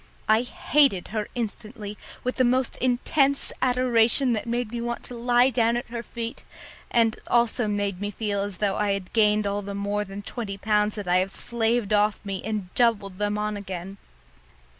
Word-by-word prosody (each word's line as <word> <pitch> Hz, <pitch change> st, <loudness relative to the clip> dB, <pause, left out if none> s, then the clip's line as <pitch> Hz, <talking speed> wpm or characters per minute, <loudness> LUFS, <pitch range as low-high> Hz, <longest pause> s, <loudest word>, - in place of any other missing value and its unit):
I 220 Hz, +1 st, +5 dB
hated 250 Hz, -4 st, +2 dB
her 215 Hz, -1 st, -2 dB
instantly 215 Hz, -2 st, -5 dB, 0.3 s
with 250 Hz, -, -2 dB
the 255 Hz, -, +4 dB
most 255 Hz, +1 st, +1 dB
intense 270 Hz, +3 st, +2 dB
adoration 250 Hz, 0 st, +4 dB
that 220 Hz, +1 st, -2 dB
made 235 Hz, -1 st, -2 dB
me 240 Hz, -1 st, -3 dB
want 235 Hz, 0 st, -3 dB
to -, -, -7 dB
lie 245 Hz, +2 st, +3 dB
down 235 Hz, -1 st, +2 dB
at 240 Hz, -, -5 dB
her 235 Hz, -1 st, -3 dB
feet, 230 Hz, 0 st, -6 dB, 0.5 s
and 225 Hz, -2 st, +3 dB
also 235 Hz, -1 st, +2 dB
made 205 Hz, -2 st, -2 dB
me 205 Hz, -, -2 dB
feel 205 Hz, -1 st, -2 dB
as 200 Hz, -2 st, -4 dB
though 200 Hz, -2 st, 0 dB
I 205 Hz, -1 st, +1 dB
had 195 Hz, -2 st, -5 dB
gained 210 Hz, -1 st, +3 dB
all 200 Hz, 0 st, -1 dB
the 200 Hz, 0 st, -6 dB
more 205 Hz, +1 st, -1 dB
than 200 Hz, 0 st, -8 dB
twenty 200 Hz, -3 st, -5 dB
pounds 210 Hz, 0 st, +1 dB
that 205 Hz, -3 st, -6 dB
I 180 Hz, +1 st, +4 dB
have 185 Hz, +1 st, 0 dB
slaved 230 Hz, -2 st, 0 dB
off 210 Hz, 0 st, +3 dB
me 195 Hz, -1 st, -3 dB
and 210 Hz, -4 st, -4 dB
doubled 205 Hz, -6 st, +1 dB
them 210 Hz, 0 st, 0 dB
on 210 Hz, 0 st, -2 dB
again. 195 Hz, -1 st, -6 dB
215 Hz, 185 wpm, -25 LUFS, 205-240 Hz, 0.5 s, I